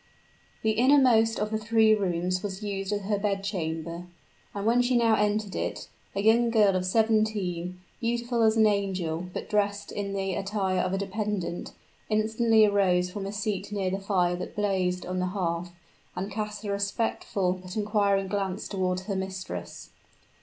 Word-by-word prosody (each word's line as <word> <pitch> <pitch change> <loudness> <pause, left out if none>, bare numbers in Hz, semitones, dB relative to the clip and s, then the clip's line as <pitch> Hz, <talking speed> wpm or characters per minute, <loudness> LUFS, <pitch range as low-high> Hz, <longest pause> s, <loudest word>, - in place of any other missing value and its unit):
The 220 - +3
innermost 235 -2 +4
of 210 +1 -1
the 220 - 0
three 220 0 +4
rooms 185 -2 0
was 200 0 -5
used 195 -1 -3
as 205 0 -1
her 205 +1 -1
bed 200 -1 -1
chamber, 170 -3 -3 0.5
and 200 0 -5
when 235 +2 +4
she 245 0 +2
now 230 -1 +4
entered 210 -1 +1
it, - - -3 0.3
a 200 - -1
young 230 +2 +4
girl 210 -4 +4
of 185 0 0
seventeen, 205 -5 +1 0.2
beautiful 235 0 -1
as 220 0 +4
an 220 - +6
angel, 185 -5 0
but - - -5
dressed 205 -1 0
in 200 -1 -3
the 195 -1 -1
attire 195 0 -1
of 185 - 0
a - - +1
dependent, 200 -2 -3 0.4
instantly 220 +1 +4
arose 185 -3 +2
from 195 0 -5
a - - -4
seat 205 -1 -3
near 195 -3 -1
the 195 - -2
fire 185 -3 +1
that 180 - -6
blazed 185 -3 0
on 185 0 -3
the 185 - 0
hearth, 170 -1 -1 0.5
and 195 +3 -4
cast 210 +1 -4
a 200 - -2
respectful 200 -2 -1
but 185 +3 -7
inquiring 205 -2 +2
glance 195 0 -2
toward 185 -2 -1
her 195 +1 -4
mistress. 190 - -6
200 Hz, 170 wpm, -27 LUFS, 185-215 Hz, 0.5 s, an